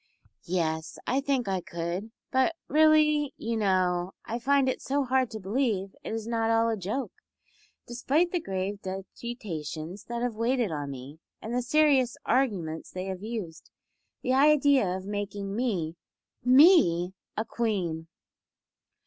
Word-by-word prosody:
"Yes, 160 -2 -1
I 265 +2 +1
think 275 -4 0
I 190 -2 0
could. 170 +5 -4 0.2
But 260 +6 +2
really, 305 -2 +4
you 230 +1 -2
know, 185 -3 +1
I 235 - -3
find 275 +2 +3
it 260 - -1
so 280 +1 0
hard 260 -1 +1
to 220 - -6
believe 200 -2 -1
it - - -5
is 225 -1 -3
not 225 -1 0
all 225 0 +3
a 225 - +1
joke, 215 +7 -3 0.7
despite 280 +8 +1
the 355 - 0
grave 195 - -3
deputations 185 - -6
that 235 0 -3
have 245 -2 0
waited 230 -1 0
on 145 -2 -3
me, 135 +3 -9 0.2
and 225 - -6
the 250 - +1
serious 265 -1 +3
arguments 185 -12 0
they 185 0 -5
have 190 -1 -5
used. 210 -7 -6 0.5
The 255 - +1
idea 285 -4 +5
of 185 +1 -3
making 200 -1 -4
me 185 -9 -1 0.5
Me 250 - +6 0.2
a 220 - 0
Queen!" 180 -10 -2
220 Hz, 145 wpm, -28 LUFS, 185-260 Hz, 0.7 s, Me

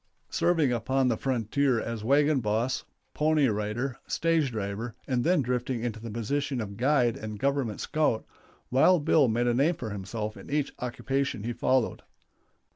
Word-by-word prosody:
Serving 160 -7 +2
upon 130 +3 +1
the 115 - +2
frontier 130 +1 +1
as 115 -1 -4
wagon 145 +4 +3
boss, 115 +3 0 0.3
pony 150 -2 +3
rider, 110 +4 -2
stage 165 -4 +1
driver, 105 +1 -4
and 125 -2 0
then 170 -3 +3
drifting 125 -1 -2
into 115 -2 -3
the 115 +1 -7
position 135 +5 -2
of 100 -3 -5
guide 125 0 +2
and 110 -1 -6
Government 135 -4 -1
scout, 150 -8 0 0.5
Wild 145 +5 +4
Bill 150 -4 +5
made 120 +2 +1
a 120 - +2
name 145 +8 +2
for 115 -7 -6
himself 105 +2 -5
in 95 - -11
each 145 0 -1
occupation 130 -2 -2
he 120 +2 -2
followed. 130 0 +1
125 Hz, 160 wpm, -28 LUFS, 110-140 Hz, 0.5 s, Bill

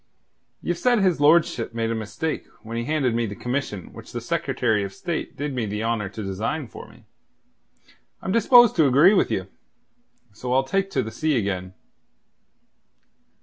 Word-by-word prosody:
Ye've 175 0 -2
said 245 -1 +3
his 185 -7 +2
lordship 145 -7 +3
made 115 0 -1
a - - 0
mistake 110 +8 -4 0.2
when 115 +1 -7
he 115 0 -2
handed 145 -5 +1
me 115 0 0
the 100 - -6
commission 125 -7 -4
which - - -11
the - - -3
Secretary 110 -4 0
of 95 -1 -6
State 170 -2 -4
did 145 -1 -3
me 120 -4 -2
the 105 +2 -3
honour 115 -3 -1
to 110 +2 -7
design 110 +9 -3
for - - -11
me. - - -19 1.1
I'm - - -4
disposed 240 +2 +6
to 155 -3 +5
agree 145 +10 +6
with - - +3
you; - - -1 0.9
so 125 +4 -4
I'll 135 +1 +3
take 195 +8 -1
to 135 -9 0
the 110 - -6
sea 155 0 0
again. 95 -3 -3
125 Hz, 175 wpm, -24 LUFS, 110-160 Hz, 1.1 s, disposed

